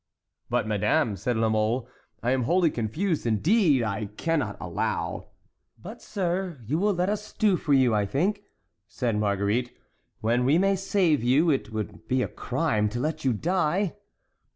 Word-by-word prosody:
"But, - - +1
madame," 105 0 +1
said 110 +5 -2
La 110 0 +2
Mole, 110 +3 0 0.4
"I 120 - +1
am 130 -2 +1
wholly 175 +2 +3
confused. 150 - -1
Indeed, 150 - +3
I 105 0 -2
cannot 150 +8 -2
allow"— - - -3 0.5
"But, - - -10
sir, 180 -4 -2
you 150 +9 0
will 205 0 +2
let 180 +1 0
us 210 +1 -3
do 210 -3 +3
for 150 -4 0
you, 130 -4 +4
I 105 -1 +1
think," 190 - 0 0.5
said 120 -3 -2
Marguerite. 105 +4 0 0.4
"When 120 +3 +1
we 140 +6 +4
may 195 +2 +3
save 185 - +1
you, 145 +7 +4
it 115 -6 -1
would 105 -1 -6
be 130 0 +1
a - - -2
crime 120 -6 -1
to 120 +3 -4
let 155 +4 -2
you 130 - +2
die." 175 - 0
130 Hz, 165 wpm, -26 LUFS, 110-175 Hz, 0.5 s, you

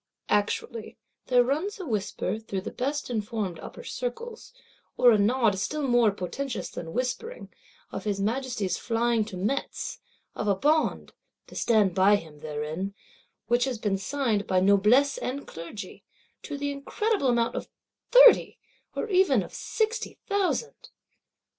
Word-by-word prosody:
_ - - -60 0.3
Actually, 215 +2 -1 0.3
there 250 -1 +5
runs 315 +12 -1
a 370 - -5
whisper 215 - -2
through 200 -4 -4
the - - -6
best 285 +3 -2
informed 210 -5 -2
Upper - - -9
Circles, 475 -2 -5 0.5
or 245 - +7
a 220 - +5
nod 215 -2 +3
still 295 +7 -1
more 240 -3 +5
potentous 220 +7 -4
than 165 -1 -6
whispering, 260 - -3 0.4
of - - -6
his 205 -2 -1
Majesty's 215 -3 -1
flying 230 -1 +1
to 205 -4 -7
Metz; 215 +10 -2 0.3
of 210 - -3
a 200 - +3
Bond 305 +10 +1 0.3
(to - - -15
stand 210 -5 +3
by 195 +3 +5
him 160 -6 -7
therein) 155 +6 -4 0.5
which 240 +1 +2
has 260 -3 -2
been 205 -3 -1
signed 225 -3 -1
by 185 -1 +3
Noblesse 210 +9 +4
and 275 +3 -4
Clergy, 170 +6 -8 0.4
to 290 - -6
the 285 0 -2
incredible 335 +5 -1
amount 235 -2 +2
of - - -5 0.4
thirty, - - +7 0.4
or - - -2
even 365 - +4
of - - -11
sixty 445 +1 -2
thousand. 405 +4 -1
235 Hz, 145 wpm, -27 LUFS, 200-285 Hz, 0.5 s, or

